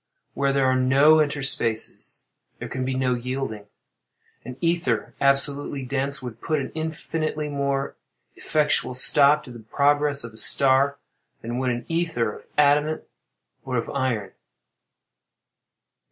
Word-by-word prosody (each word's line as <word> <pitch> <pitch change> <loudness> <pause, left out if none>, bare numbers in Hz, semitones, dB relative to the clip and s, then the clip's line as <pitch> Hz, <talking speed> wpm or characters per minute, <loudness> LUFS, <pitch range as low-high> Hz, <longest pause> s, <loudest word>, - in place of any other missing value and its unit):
Where 140 0 0
there 135 -1 +1
are 130 0 +3
no 135 +5 +5
interspaces, 135 -7 0 0.4
there - - -7
can 130 0 -4
be 130 0 -2
no 130 -1 +1
yielding. 125 -4 -4 0.8
An 125 +1 -9
ether, 165 -10 -1
absolutely 140 0 +1
dense, 135 +1 -2
would 120 -2 -8
put 155 - -1
an 135 - -5
infinitely 155 -1 -3
more 140 -1 -2 0.4
effectual 150 -4 0
stop 145 +3 +5
to 125 - -12
the 120 - -10
progress 145 +5 +1
of 115 -1 -9
a 110 - -11
star 135 +4 +3 0.5
than 120 +2 -4
would 130 -1 0
an 120 -1 -3
ether 165 -10 -1
of - - -14
adamant 150 +1 +3 0.6
or - - -3
of - - -3
iron. 115 -7 -2
140 Hz, 135 wpm, -24 LUFS, 125-145 Hz, 0.8 s, no